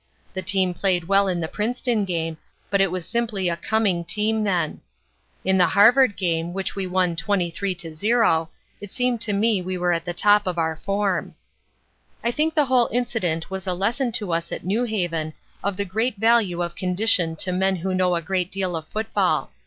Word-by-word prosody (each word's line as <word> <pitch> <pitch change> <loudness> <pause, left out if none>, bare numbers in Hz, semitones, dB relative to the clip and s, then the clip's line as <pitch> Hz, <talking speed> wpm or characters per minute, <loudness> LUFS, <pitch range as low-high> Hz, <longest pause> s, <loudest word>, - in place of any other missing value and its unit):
The 185 - -3
team 190 -1 +1
played 180 -1 0
well 200 +1 +4
in 180 -2 -1
the 160 - -2
Princeton 230 +2 -1
game, 165 -3 -3 0.3
but 200 -1 +3
it 195 - +3
was 180 -1 -4
simply 220 -6 -1
a 170 - -1
coming 200 -3 0
team 215 +5 0
then. 180 -6 -1 0.6
In 190 0 +3
the 180 - +5
Harvard 225 +3 +5
game, 170 -2 -1
which 195 0 -3
we 195 -2 -2
won 180 -2 +1
23 190 0 -1
to 165 -2 -7
0, 185 -3 +2 0.3
it 205 -1 -9
seemed 250 -2 0
to 225 - -1
me 205 0 +2
that 180 - -9
we 185 0 -2
were 175 0 +1
at 165 -1 -2
the 175 - -2
top 205 +1 +4
of 180 -1 -2
our 160 -1 0
form. 195 -1 -1 0.9
"I 235 - +1
think 315 +5 0
the 300 -2 +4
whole 255 -2 +3
incident 210 -10 -1
was 190 0 -5
a 180 - 0
lesson 235 +7 0
to 205 -7 -2
us 165 0 -2
at - - -5
New 215 +6 +1
Haven 170 -8 -2 0.3
of 200 -1 -1
the 200 - -1
great 220 +6 -1
value 215 -5 +3
of 170 0 -5
condition 180 -3 +1
to 185 +3 -1
men 190 +1 +1
who 185 +2 -3
know 185 -1 +2
a 170 - -2
great 185 +1 -1
deal 190 -3 -1
of 160 -1 -5
football. 220 +1 0
190 Hz, 205 wpm, -23 LUFS, 175-215 Hz, 0.9 s, the